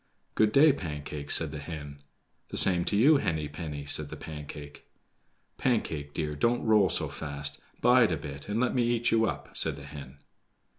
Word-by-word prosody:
"Good 110 -1 +3
day, 145 +4 +6
Pancake," 75 - -6
said 80 -3 +2
the 75 - -6
hen. 75 -2 -8 0.5
"The - - -6
same 90 -2 +6
to 100 - 0
you, 145 +7 +6
Henny 80 - -2
penny," 75 -1 -7
said 70 +1 +2
the - - -7
Pancake. 75 -1 -9 0.7
"Pancake, 80 - -1
dear, 75 -2 -2
don't 120 +11 0
roll 105 -3 +4
so - - -2
fast; 70 -2 -3 0.2
bide 120 -4 +5
a 80 - 0
bit 70 +3 -9
and 105 +2 -1
let 125 0 +1
me 125 - +1
eat 120 0 +1
you 115 0 +3
up," - - -6
said 80 -3 -1
the 70 - -11
hen. 70 -1 -10
80 Hz, 185 wpm, -28 LUFS, 75-110 Hz, 0.7 s, day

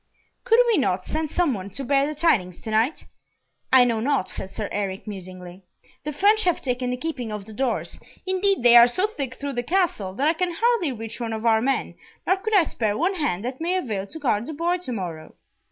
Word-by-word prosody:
"Could 460 -2 +5
we 455 -7 +3
not 185 -7 0
send 310 0 -2
some 340 -3 +1
one 195 -2 -6
to 240 +8 -6
bear 275 +1 +2
the 305 - -4
tidings 215 - +1
to 220 - -6
night?" 225 +8 +1 0.7
"I 260 -1 +8
know 230 -2 0
not," 265 -4 0
said 190 - -5
Sir 210 +1 -4
Eric, 195 -2 -3
musingly. 185 -2 -9 0.4
"The 300 - -2
French 415 +8 +3
have 355 -2 +2
taken 250 -1 -2
the 250 - -2
keeping 250 -6 -4
of 210 -2 -6
the 220 - -10
doors; 255 +1 -2 0.3
indeed 375 -3 +1
they 240 0 +7
are 235 0 +10
so 365 +11 +1
thick 275 - -4
through 285 -1 -5
the 245 - -1
Castle 245 - 0
that 280 +6 +1
I 320 - +4
can 350 +1 -2
hardly 460 - +2
reach 225 -1 -7
one 230 -2 -3
of 220 +1 -5
our 220 -1 +4
men, 270 +3 -1 0.3
nor 375 - +3
could 435 +3 -1
I 380 - +6
spare 215 -8 -2
one 360 +5 +1
hand 240 - -2
that 260 +4 -5
may 350 +3 0
avail 215 - -2
to 320 - -9
guard 235 -7 0
the 315 - -5
boy 345 +4 0
to 350 -8 -6
morrow." 170 -8 -6
255 Hz, 230 wpm, -24 LUFS, 215-335 Hz, 0.7 s, are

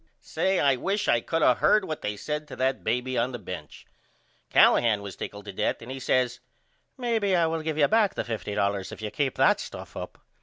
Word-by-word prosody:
Say, 190 0 0
I 140 -2 +3
wish 200 +9 -1
I 120 - +3
could 165 +4 -1
of 125 - +4
heard 210 -2 +4
what 155 -3 -5
they 105 0 -3
said 150 +6 -4
to - - -8
that 130 +1 0
baby 125 +1 0
on 125 +2 0
the - - -3
bench. 90 -8 -9 0.6
Callahan 110 -4 +4
was 100 -2 -7
tickled 100 0 -7
to 100 - -7
death - - -1
and 120 +3 -9
he 135 - -5
says 125 -1 +1 0.6
Maybe 225 -6 +1
I 170 -2 +3
will 160 0 -1
give 155 -1 -3
you 145 -2 +5
back 215 -1 +2
the - - -1
$50.00 100 -4 -2
if - - -9
you 105 -1 -5
keep 140 -3 -1
that - - +4
stuff - - -8
up. - - -7
130 Hz, 220 wpm, -26 LUFS, 105-160 Hz, 0.6 s, you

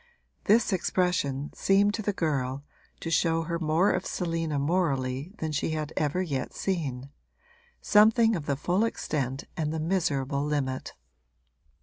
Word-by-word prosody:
This 220 0 +4
expression 170 -6 0
seemed 200 +1 +3
to 220 - -2
the 205 - 0
girl 140 -7 -1 0.4
to 165 - -4
show 165 -1 +2
her 170 +1 -3
more 160 +4 +2
of 185 0 -1
Selina 165 -4 -2
morally 140 -2 0
than 160 -1 -3
she 150 +2 -1
had 155 0 -4
ever 155 +5 0
yet 135 -7 -3
seen 140 -8 -3 0.7
something 225 +1 +5
of 155 -5 -5
the 140 - +1
full 180 +8 +1
extent 140 - -2
and 155 -3 -1
the 160 - -2
miserable 145 -5 0
limit. 140 -3 -2
160 Hz, 140 wpm, -28 LUFS, 140-185 Hz, 0.7 s, something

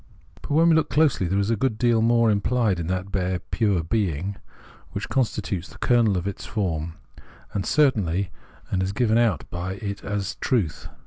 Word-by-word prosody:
But, - - -10
when 165 +3 +4
we - - +6
look 160 -2 +2
closely, 145 - +2
there 95 +3 0
is 100 +2 +1
a - - +3
good 110 0 0
deal 120 -1 +3
more 115 0 +4
implied 105 -2 +1
in 85 - -3
that 95 +2 -2
bare 90 -1 0
pure 95 0 0
being, 95 0 -1 0.6
which - - -4
constitutes 105 -8 -1
the - - -14
kernel 115 -5 +3
of 90 - -2
this 100 0 -5
form 85 -6 -2 0.6
of 100 -2 -2
certainty, 100 - +2 0.4
and 95 - +1
is 95 +1 -1
given 115 0 +2
out 100 - +1
by 90 +2 -3
it 100 -1 -5
as 100 0 -2
its 95 - -5
truth. 100 - -1
100 Hz, 190 wpm, -24 LUFS, 90-115 Hz, 0.6 s, we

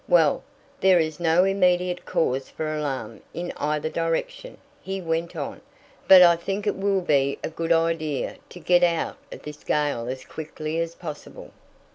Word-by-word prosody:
"Well, - - +4 0.4
there 190 -1 +5
is 155 -1 -1
no 170 +1 +4
immediate 180 -2 +1
cause 135 -3 0
for 155 -1 -4
alarm 130 -8 -4
in 175 +1 -4
either 150 +1 -1
direction," 335 - -3 0.2
he 195 0 -4
went 165 -1 -2
on, - - -5 0.5
"but 185 -1 +10
I 170 -1 +6
think 195 +4 -4
it 205 - +1
will 195 0 +1
be 140 -4 +1
a - - -3
good 165 +1 -3
idea 165 -3 0
to 180 - -11
get 175 0 +3
out 170 -2 +1
of - - -10
this 150 0 -9
gale 145 -6 0
as 130 +1 -5
quickly 155 0 -5
as 165 0 -3
possible." 155 -4 -9
165 Hz, 165 wpm, -24 LUFS, 150-180 Hz, 0.5 s, but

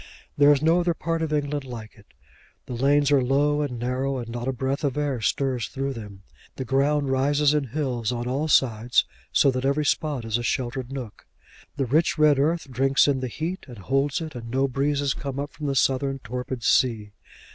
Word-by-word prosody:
There 145 0 +6
is 145 0 +2
no 165 +2 +4
other 175 -1 0
part 165 0 -2
of 160 -1 -2
England 145 -1 -1
like 115 -4 -8
it. 105 -2 -20 0.6
The - - -6
lanes 140 +3 +2
are 140 -2 +5
low 145 +3 +2
and 135 -5 -3
narrow, 130 +3 -1
and 120 -2 -6
not 120 +1 -5
a - - +2
breath 135 +3 -2
of 140 -1 -1
air 140 -5 -1
stirs 130 +1 0
through 135 0 -3
them. 105 -5 -10 0.3
The 130 - -5
ground 140 +2 +1
rises 145 +2 +2
in 150 -2 +1
hills 125 -4 -2
on 120 0 -3
all 140 +5 -1
sides, 120 -5 +3 0.3
so 140 - +4
that 130 0 -3
every 140 +2 +1
spot 145 -6 0
is 115 +1 0
a - - -4
sheltered 125 +1 -2
nook. 130 -6 -8 0.5
The 140 -2 -1
rich 155 +8 +2
red 150 -2 +4
earth 160 +2 +1
drinks 135 +3 +3
in 140 -2 +2
the 130 - -3
heat 165 +9 -4
and 120 -3 -10
holds 135 - 0
it, 160 -2 -6
and 115 -2 -8
no 135 +3 +1
breezes 140 +1 0
come 140 -1 -5
up 145 +1 -4
from 150 - -5
the 140 - -1
southern 135 +1 +1
torpid 125 0 -5
sea. 110 -5 +2
135 Hz, 210 wpm, -25 LUFS, 125-145 Hz, 0.6 s, There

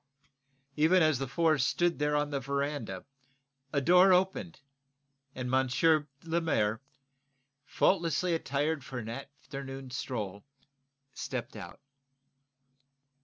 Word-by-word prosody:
Even 165 +4 +4
as 155 -4 +3
the 135 - -2
four 155 +3 +2
stood 170 +7 +1
there 150 0 +1
on 145 0 0
the 140 - -1
veranda 140 -7 -3 0.7
a 140 - +1
door 180 +6 +6
opened, 180 -2 +1 0.8
and 125 0 -4
M. 145 +4 +3 0.2
Lemaire, 160 -10 0 0.9
faultlessly 170 -1 +1
attired 145 0 -1
for 130 - -7
an 115 -2 -5
afternoon 135 0 -8
stroll, 105 -6 -4 0.7
stepped - - -5
out. - - -9
140 Hz, 105 wpm, -30 LUFS, 130-165 Hz, 0.9 s, door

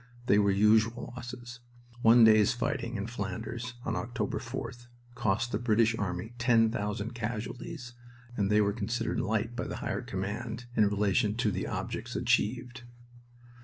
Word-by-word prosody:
They 105 - +5
were 100 -1 +3
usual 110 +4 +3
losses. 120 0 -8 0.4
One 115 +1 +7
day's 110 -2 +6
fighting 120 0 -2
in 100 -1 -2
Flanders 115 +3 -5
(on 115 - -1
October 120 +1 -2
4th) 120 0 -6 0.3
cost 115 -1 0
the 105 - 0
British 115 -1 +3
army 95 +1 -3
ten 115 -2 +4
thousand 105 +2 -3
casualties, 120 +4 -5 0.4
and 100 -3 +1
they 105 0 +5
were 100 0 +2
considered 115 +1 -2
"light" 110 +2 -1
by - - -3
the - - -4
Higher - - -3
Command 110 +5 -4
in 105 -2 +5
relation 105 +1 +1
to 115 -2 +1
the - - -3
objects - - -4
achieved. 120 +2 0
115 Hz, 150 wpm, -30 LUFS, 105-120 Hz, 0.4 s, One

